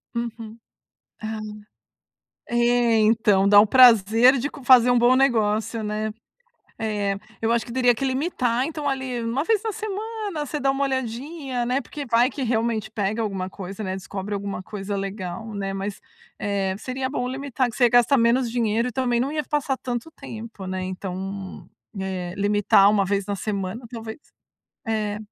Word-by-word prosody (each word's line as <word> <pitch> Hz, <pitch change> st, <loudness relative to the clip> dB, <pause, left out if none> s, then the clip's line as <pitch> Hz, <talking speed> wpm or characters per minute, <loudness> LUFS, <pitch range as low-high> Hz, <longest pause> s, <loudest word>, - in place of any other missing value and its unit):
Uhum. 230 Hz, -1 st, -5 dB, 0.7 s
Ah. 220 Hz, 0 st, -4 dB, 1.1 s
É, 240 Hz, -1 st, +3 dB
então, 215 Hz, -3 st, +3 dB
dá 205 Hz, 0 st, +8 dB
um 210 Hz, -, +7 dB
prazer 235 Hz, +1 st, +6 dB
de 275 Hz, -, -1 dB
c -, -, -11 dB
fazer 250 Hz, -1 st, +7 dB
um 245 Hz, -, +4 dB
bom 245 Hz, +2 st, +5 dB
negócio, 225 Hz, -4 st, +1 dB
né? 215 Hz, +1 st, -2 dB, 0.7 s
É, 205 Hz, -2 st, -1 dB, 0.3 s
eu 225 Hz, +1 st, +2 dB
acho 235 Hz, -1 st, 0 dB
que 235 Hz, -, -8 dB
teria 245 Hz, -1 st, +3 dB
que 255 Hz, -, -4 dB
limitar, 260 Hz, -3 st, 0 dB
então 300 Hz, -1 st, -3 dB
ali, 260 Hz, -3 st, -2 dB
uma 235 Hz, +6 st, -1 dB
vez 435 Hz, +1 st, +2 dB
na 445 Hz, -, -2 dB
semana, 425 Hz, -5 st, -4 dB
você 300 Hz, -, -3 dB
dá 275 Hz, -1 st, +2 dB
uma 275 Hz, +1 st, 0 dB
olhadinha, 260 Hz, +1 st, -3 dB
né? 250 Hz, +2 st, +1 dB
Porque 290 Hz, -2 st, -7 dB
vai 240 Hz, +2 st, +3 dB
que 275 Hz, -, -5 dB
realmente 225 Hz, -3 st, 0 dB
pega 215 Hz, +1 st, -2 dB
alguma 195 Hz, -4 st, -3 dB
coisa, 195 Hz, +2 st, -7 dB
né? 185 Hz, -, -3 dB
Descobre 195 Hz, +1 st, -6 dB
alguma 200 Hz, -2 st, -4 dB
coisa 200 Hz, 0 st, -5 dB
legal, 195 Hz, +2 st, -5 dB
né? 195 Hz, -1 st, -3 dB
Mas, 195 Hz, +1 st, -4 dB, 0.4 s
eh, 195 Hz, -2 st, -1 dB
seria 260 Hz, +2 st, -4 dB
bom 250 Hz, -3 st, -2 dB
limitar, 265 Hz, -1 st, -1 dB
que 240 Hz, -, -8 dB
você 245 Hz, -2 st, +4 dB
gasta 245 Hz, +3 st, +5 dB
menos 235 Hz, 0 st, +2 dB
dinheiro 230 Hz, 0 st, 0 dB
e -, -, -6 dB
também 245 Hz, 0 st, 0 dB
não 270 Hz, -, 0 dB
ia 300 Hz, 0 st, -2 dB
passar 290 Hz, -2 st, -1 dB
tanto 245 Hz, +4 st, -5 dB
tempo, 225 Hz, -8 st, -9 dB
né? 185 Hz, 0 st, -3 dB
Então, 190 Hz, +1 st, -6 dB, 0.3 s
eh, 185 Hz, -2 st, -4 dB
limitar 205 Hz, -1 st, +4 dB
uma 205 Hz, -2 st, +2 dB
vez 200 Hz, 0 st, -1 dB
na 205 Hz, -1 st, -2 dB
semana, 205 Hz, +3 st, -4 dB
talvez? 225 Hz, -2 st, -7 dB, 0.7 s
É. 215 Hz, -2 st, -1 dB
230 Hz, 170 wpm, -24 LUFS, 205-255 Hz, 1.1 s, dá